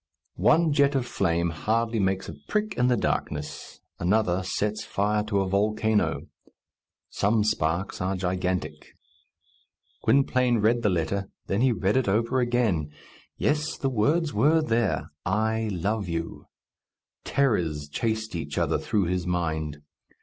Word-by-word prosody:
One 165 Hz, -2 st, +4 dB
jet 140 Hz, -1 st, +3 dB
of 130 Hz, -3 st, +1 dB
flame 85 Hz, -6 st, 0 dB
hardly 115 Hz, +7 st, 0 dB
makes 95 Hz, -1 st, 0 dB
a -, -, -6 dB
prick 210 Hz, -1 st, -1 dB
in 125 Hz, -, +2 dB
the 125 Hz, -1 st, +3 dB
darkness; 75 Hz, -6 st, -3 dB, 0.2 s
another 95 Hz, 0 st, +2 dB
sets 105 Hz, +3 st, -2 dB
fire 105 Hz, +1 st, 0 dB
to 100 Hz, -2 st, +1 dB
a 95 Hz, -, -1 dB
volcano. 110 Hz, +2 st, +1 dB, 0.9 s
Some 105 Hz, +1 st, +2 dB
sparks 85 Hz, -2 st, -1 dB
are 95 Hz, +2 st, 0 dB
gigantic. 90 Hz, 0 st, -3 dB, 1.1 s
Gwynplaine 130 Hz, -3 st, +3 dB
read 115 Hz, +3 st, +2 dB
the 105 Hz, -, +2 dB
letter, 95 Hz, +3 st, -1 dB, 0.2 s
then 100 Hz, +3 st, 0 dB
he 130 Hz, 0 st, +4 dB
read 100 Hz, +1 st, +1 dB
it 130 Hz, -, +1 dB
over 115 Hz, +6 st, +1 dB
again. 120 Hz, -11 st, +1 dB, 0.5 s
Yes, 150 Hz, +1 st, 0 dB
the 135 Hz, -, -1 dB
words 145 Hz, +8 st, +1 dB
were 150 Hz, +9 st, +3 dB
there, 115 Hz, -5 st, 0 dB
"I 110 Hz, +3 st, 0 dB
love 100 Hz, +2 st, -2 dB
you!" 85 Hz, 0 st, -4 dB, 0.8 s
Terrors 85 Hz, -, 0 dB
chased 110 Hz, +6 st, -2 dB
each 75 Hz, -3 st, -5 dB
other -, -, +1 dB
through 100 Hz, -3 st, 0 dB
his 90 Hz, 0 st, -1 dB
mind. 80 Hz, -4 st, -2 dB
105 Hz, 135 wpm, -26 LUFS, 90-120 Hz, 1.1 s, One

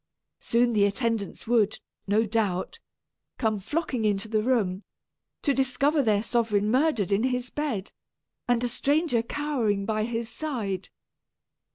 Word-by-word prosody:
Soon 240 Hz, +1 st, +2 dB
the 205 Hz, -2 st, +4 dB
attendants 215 Hz, 0 st, -1 dB
would, 220 Hz, -3 st, +2 dB, 0.3 s
no 215 Hz, +3 st, +3 dB
doubt, 205 Hz, -4 st, -1 dB, 0.6 s
come 220 Hz, -3 st, 0 dB
flocking 290 Hz, -, -2 dB
into 205 Hz, 0 st, +1 dB
the 215 Hz, -1 st, +1 dB
room, 210 Hz, -6 st, +1 dB, 0.6 s
to 280 Hz, -, +3 dB
discover 275 Hz, +3 st, +2 dB
their 215 Hz, -4 st, +2 dB
sovereign 215 Hz, -3 st, +1 dB
murdered 255 Hz, -, +2 dB
in 200 Hz, +5 st, +2 dB
his 250 Hz, -1 st, -1 dB
bed, 265 Hz, -10 st, -3 dB, 0.6 s
and 245 Hz, -1 st, +2 dB
a -, -, +2 dB
stranger 285 Hz, 0 st, +1 dB
cowering 235 Hz, -7 st, -1 dB
by 215 Hz, 0 st, 0 dB
his 230 Hz, 0 st, -3 dB
side. 225 Hz, -, -4 dB
230 Hz, 135 wpm, -27 LUFS, 210-255 Hz, 0.6 s, the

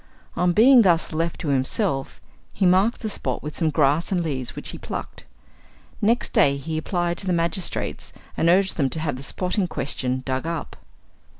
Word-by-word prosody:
On 180 Hz, 0 st, +2 dB
being 245 Hz, +7 st, +7 dB
thus 170 Hz, -5 st, +2 dB
left 165 Hz, +1 st, -2 dB
to 155 Hz, -, -3 dB
himself, 135 Hz, -, -1 dB, 0.3 s
he 195 Hz, -, 0 dB
marked 190 Hz, +6 st, +3 dB
the 220 Hz, -, -3 dB
spot 130 Hz, -10 st, -4 dB
with 150 Hz, +1 st, -6 dB
some 160 Hz, -3 st, +1 dB
grass 150 Hz, +4 st, +2 dB
and 180 Hz, -3 st, +1 dB
leaves 135 Hz, -6 st, -3 dB
which -, -, -4 dB
he -, -, -7 dB
plucked. -, -, -7 dB, 0.8 s
Next 230 Hz, +4 st, +2 dB
day 140 Hz, 0 st, +4 dB
he 155 Hz, +3 st, -5 dB
applied 175 Hz, +1 st, -2 dB
to 195 Hz, -, -6 dB
the 180 Hz, -, +2 dB
magistrates, 170 Hz, +2 st, -2 dB, 0.2 s
and 165 Hz, -, +2 dB
urged 190 Hz, +2 st, +3 dB
them 140 Hz, -4 st, +1 dB
to 145 Hz, -, -2 dB
have 150 Hz, -4 st, -2 dB
the 130 Hz, -, -8 dB
spot 180 Hz, +8 st, -2 dB
in 185 Hz, -, +1 dB
question 130 Hz, -4 st, -3 dB
dug 130 Hz, +3 st, -2 dB
up. 165 Hz, -2 st, -4 dB
165 Hz, 190 wpm, -23 LUFS, 140-185 Hz, 0.8 s, being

